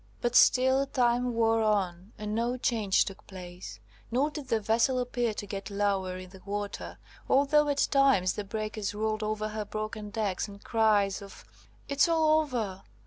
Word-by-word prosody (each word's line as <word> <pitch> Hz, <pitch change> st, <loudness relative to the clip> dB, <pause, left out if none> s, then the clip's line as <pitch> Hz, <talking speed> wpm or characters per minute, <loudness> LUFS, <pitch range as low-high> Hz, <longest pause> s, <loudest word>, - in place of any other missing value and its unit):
But 240 Hz, 0 st, -1 dB
still 260 Hz, +2 st, +5 dB
time 245 Hz, -1 st, +1 dB
wore 225 Hz, 0 st, +3 dB
on, 195 Hz, -3 st, 0 dB
and 210 Hz, 0 st, -4 dB
no 235 Hz, +3 st, 0 dB
change 220 Hz, -6 st, +2 dB
took 195 Hz, -, -9 dB
place, 175 Hz, -, -9 dB, 0.3 s
nor 270 Hz, +6 st, +1 dB
did 295 Hz, -3 st, -7 dB
the 230 Hz, -3 st, +1 dB
vessel 230 Hz, +5 st, +2 dB
appear 245 Hz, -2 st, -1 dB
to 205 Hz, -, -5 dB
get 200 Hz, 0 st, -6 dB
lower 200 Hz, -2 st, -1 dB
in 185 Hz, 0 st, -10 dB
the 190 Hz, -1 st, -14 dB
water, 205 Hz, 0 st, -5 dB, 0.3 s
although 285 Hz, +2 st, +4 dB
at 285 Hz, 0 st, +2 dB
times 270 Hz, -10 st, +4 dB
the 210 Hz, -, -4 dB
breakers 215 Hz, 0 st, -4 dB
rolled 215 Hz, 0 st, -1 dB
over 215 Hz, 0 st, -2 dB
her 215 Hz, 0 st, -4 dB
broken 215 Hz, 0 st, -5 dB
decks, 205 Hz, -3 st, -2 dB
and 200 Hz, 0 st, -12 dB
cries 210 Hz, -4 st, +2 dB
of 200 Hz, -1 st, -12 dB, 0.4 s
"It's 285 Hz, +4 st, +3 dB
all 315 Hz, -1 st, +4 dB
over! 225 Hz, -11 st, -3 dB
215 Hz, 170 wpm, -29 LUFS, 200-250 Hz, 0.4 s, still